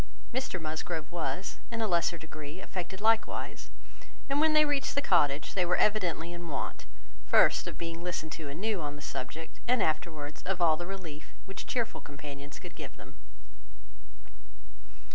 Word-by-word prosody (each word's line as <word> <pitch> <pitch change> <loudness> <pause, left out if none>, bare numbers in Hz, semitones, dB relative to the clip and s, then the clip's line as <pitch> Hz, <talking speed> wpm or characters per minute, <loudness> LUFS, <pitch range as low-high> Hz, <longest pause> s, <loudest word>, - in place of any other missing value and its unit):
Mr 260 -7 -1
Musgrove 160 0 -3
was, 175 +2 -2
in 230 - -2
a 220 - +2
lesser 170 -2 +3
degree, 155 0 -7
affected 190 0 -5
likewise; 225 +1 +2 0.6
and 285 +2 +4
when 315 0 +5
they 305 0 +7
reached 290 -1 +1
the - - +4
cottage, 145 - +3
they 185 - +3
were 180 +1 +3
evidently 175 -5 +2
in 175 0 -6
want, 145 -4 -3 0.4
first, - - +6
of - - -4
being 165 0 -4
listened 170 -3 -2
to 155 -3 -5
anew 190 +6 -1
on 145 -1 -3
this 145 0 -8
subject, 160 +5 -5
and 245 -4 +4
afterwards, 155 -1 -1
of 190 -1 -1
all 165 -3 +6
the 175 +2 -5
relief 170 -6 -7
which 195 - -7
cheerful 235 -2 0
companions 140 0 -8
could - - -9
give - - -7
them. - - -12
170 Hz, 160 wpm, -31 LUFS, 155-200 Hz, 0.6 s, they